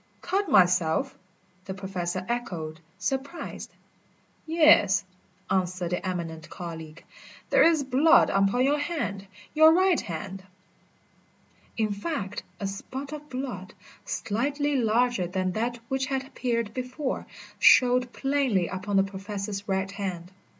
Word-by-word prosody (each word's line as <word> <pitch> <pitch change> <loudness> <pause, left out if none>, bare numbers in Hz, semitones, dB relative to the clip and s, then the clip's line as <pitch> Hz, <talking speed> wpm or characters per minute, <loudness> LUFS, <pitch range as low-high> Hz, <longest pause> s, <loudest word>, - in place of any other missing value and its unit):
"Cut 385 +1 -1
myself?" 180 - +3 0.5
the 190 - -5
Professor 185 -2 -4
echoed, 170 -10 -4 0.2
surprised. 270 - -4 0.8
"Yes," 320 -1 +5 0.4
answered 180 -2 -1
the 180 - -2
eminent 165 -4 -4
colleague, 165 -2 -8 0.5
"there - - +5
is 325 -3 +5
blood 285 +6 +5
upon 195 +6 +2
your 290 +2 +2
hand 290 - -3 0.3
your 315 +1 +7
right 370 0 +3
hand." 190 +2 -6 1.4
In 215 -2 +1
fact 205 - -4 0.2
a 200 - -3
spot 260 +8 -6
of 300 0 -8
blood, 250 -8 -6 0.3
slightly 275 - -1
larger 240 -4 +2
than 185 +1 -1
that 235 +5 -2
which 265 0 -1
had 270 -1 -2
appeared 235 -5 -2
before, 255 +2 -4 0.3
showed 250 -1 +5
plainly 270 -11 +1
upon 190 +2 -3
the 195 - +5
Professor's 200 +1 -5
right 190 0 0
hand. 185 -3 -5
210 Hz, 120 wpm, -27 LUFS, 185-270 Hz, 1.4 s, your